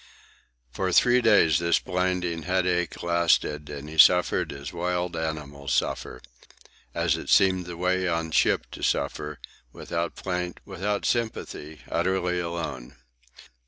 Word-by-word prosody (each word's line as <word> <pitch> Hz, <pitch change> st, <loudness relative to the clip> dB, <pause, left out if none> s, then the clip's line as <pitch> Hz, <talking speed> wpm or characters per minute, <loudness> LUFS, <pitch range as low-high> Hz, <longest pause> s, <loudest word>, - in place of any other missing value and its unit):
For 95 Hz, +8 st, -2 dB
three 125 Hz, +6 st, +5 dB
days 100 Hz, -, +4 dB
this 85 Hz, 0 st, +2 dB
blinding 90 Hz, -2 st, -1 dB
headache 90 Hz, -2 st, -1 dB
lasted, 85 Hz, -3 st, +1 dB
and 70 Hz, 0 st, -7 dB
he 80 Hz, +1 st, -6 dB
suffered 90 Hz, +2 st, +5 dB
as 70 Hz, +1 st, -8 dB
wild 90 Hz, 0 st, -2 dB
animals 75 Hz, -3 st, -3 dB
suffer, 60 Hz, -, -2 dB, 0.7 s
as -, -, +1 dB
it -, -, -8 dB
seemed 95 Hz, -3 st, +4 dB
the 85 Hz, -1 st, -7 dB
way 90 Hz, +1 st, 0 dB
on 85 Hz, -1 st, -1 dB
ship -, -, +2 dB
to -, -, -9 dB
suffer, 75 Hz, -1 st, -1 dB, 0.3 s
without 85 Hz, +4 st, -4 dB
plaint, 90 Hz, -2 st, -4 dB
without 100 Hz, +2 st, -3 dB
sympathy, 80 Hz, -, -3 dB
utterly 90 Hz, +1 st, 0 dB
alone. 80 Hz, -8 st, -5 dB
85 Hz, 125 wpm, -26 LUFS, 80-90 Hz, 0.7 s, three